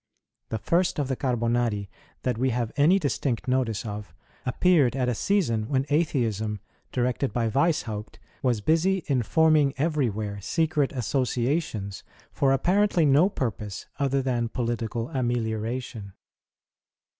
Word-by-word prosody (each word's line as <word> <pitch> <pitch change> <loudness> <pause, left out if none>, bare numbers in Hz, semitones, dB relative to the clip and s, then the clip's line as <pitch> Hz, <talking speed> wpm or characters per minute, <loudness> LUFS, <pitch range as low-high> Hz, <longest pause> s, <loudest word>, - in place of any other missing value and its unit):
The 110 - -2
first 170 - +1
of 145 -3 -1
the 130 - 0
Carbonari 120 -5 0 0.4
that 125 -2 0
we 130 +1 +2
have 120 -2 -1
any 155 +7 +5
distinct 140 - -1
notice 125 -4 0
of, 105 -1 -6 0.3
appeared 140 -2 +3
at 130 -2 0
a 125 - +1
season 115 - 0
when 135 -1 +1
Atheism, 115 - 0 0.3
directed 125 +2 0
by 120 -2 0
Wieshaupt, 115 -6 -1 0.2
was 120 -5 +1
busy 170 - +2
in 135 -4 +1
forming 155 +1 +3
everywhere 110 -10 -1
secret 155 - +1
associations 125 - -1 0.3
for 135 - +2
apparently 180 +4 +3
no 145 +7 +5
purpose 105 - -4
other 135 -1 +1
than 120 -3 0
political 115 -1 -2
amelioration. 115 -3 -2
125 Hz, 125 wpm, -26 LUFS, 115-145 Hz, 0.4 s, any